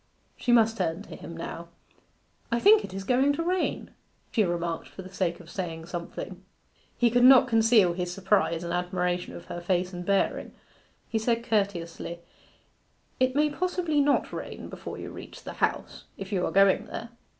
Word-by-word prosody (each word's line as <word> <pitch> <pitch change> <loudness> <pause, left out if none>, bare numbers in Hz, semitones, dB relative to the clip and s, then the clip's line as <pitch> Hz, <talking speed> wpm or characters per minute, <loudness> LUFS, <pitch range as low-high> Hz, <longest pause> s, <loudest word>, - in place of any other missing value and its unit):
She 245 - -1
must 225 -1 +4
turn 165 +2 -1
to - - -10
him 165 +2 -9
now. 170 0 -6 0.8
'I 235 - +2
think 415 - +6
it - - -7
is 195 +1 -5
going 260 +6 +3
to 330 - -2
rain,' 365 +1 -1 0.4
she 220 - +3
remarked 170 -2 -2
for 190 - -10
the 185 +1 -12
sake 175 -3 -1
of 175 - -13
saying 165 -3 -5
something. 175 - -7 0.5
He 240 -1 +3
could 245 +1 +3
not 260 0 +8
conceal 225 -5 +4
his 180 0 -3
surprise 190 -3 +1
and 170 - -3
admiration 180 0 -1
of 175 - -10
her 175 - -6
face 180 +1 0
and 175 0 -5
bearing. 195 +2 0 0.5
He 225 - -1
said 235 +1 0
courteously, 175 -5 -1 1.0
'It 255 0 +2
may 300 +1 +3
possibly 345 -2 0
not 285 0 +1
rain - - -6
before - - -7
you - - -7
reach - - -10
the - - -7
House, - - -1
if 195 +1 -7
you 185 -3 0
are - - -3
going 195 0 +4
there? 230 - -6
195 Hz, 180 wpm, -27 LUFS, 175-245 Hz, 1.0 s, not